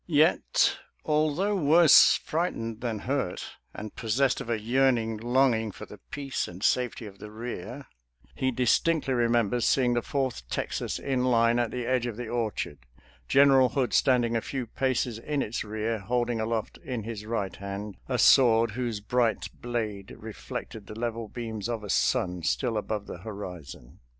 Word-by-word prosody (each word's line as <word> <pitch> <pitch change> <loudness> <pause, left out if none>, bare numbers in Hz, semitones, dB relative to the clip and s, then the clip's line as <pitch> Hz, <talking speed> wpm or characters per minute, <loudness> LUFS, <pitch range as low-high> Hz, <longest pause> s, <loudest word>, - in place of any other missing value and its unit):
Yet, 155 -1 +3 0.3
although 155 +7 +1
worse 165 -2 +7
fright 170 +3 -2
ened 115 -1 -5
than 115 -3 -2
hurt, 135 -8 -3
and 105 0 -8
possessed 125 +4 +1
of - - -7
a 115 -2 0
yearning 115 -1 +1
longing 120 -1 +2
for - - -10
the - - -13
peace 140 -2 -3
and 90 +3 -9
safety 125 -2 +1
of 100 -2 -11
the 105 - -9
rear, 115 +3 -7 0.5
he 130 - 0
distinctly 130 +4 +2
remembers 120 -1 +2
seeing 125 -2 +3
the 120 - +1
Fourth 125 - -3
Texas - - -2
in 130 -2 -1
line 115 -1 +3
at 120 -2 +1
the 125 -1 -4
edge 125 -1 +1
of 115 -3 -5
the 120 -1 -5
orchard, 110 - -3 0.5
General 135 - +5
Hood 130 -2 -1
standing 120 -3 +3
a 115 - +1
few 130 0 -4
paces 125 -1 -1
in 145 +3 -1
its 110 - -3
rear, 110 +1 -2
holding 120 +2 -1
aloft 110 0 -3
in 125 -5 -5
his 110 -1 -6
right 105 -5 -2
hand 100 +1 -6
a 125 - 0
sword 115 -3 +5
whose 115 -2 -3
bright 115 +1 0
blade 110 -5 -4
reflected 110 -1 -7
the 105 - -9
level 115 -1 -3
beams 110 -2 -5
of 115 -3 -3
a 105 - -3
sun 90 -1 +1
still 115 +8 0
above 105 -1 -3
the - - -8
horizon. 90 - -9
115 Hz, 165 wpm, -27 LUFS, 110-130 Hz, 0.5 s, worse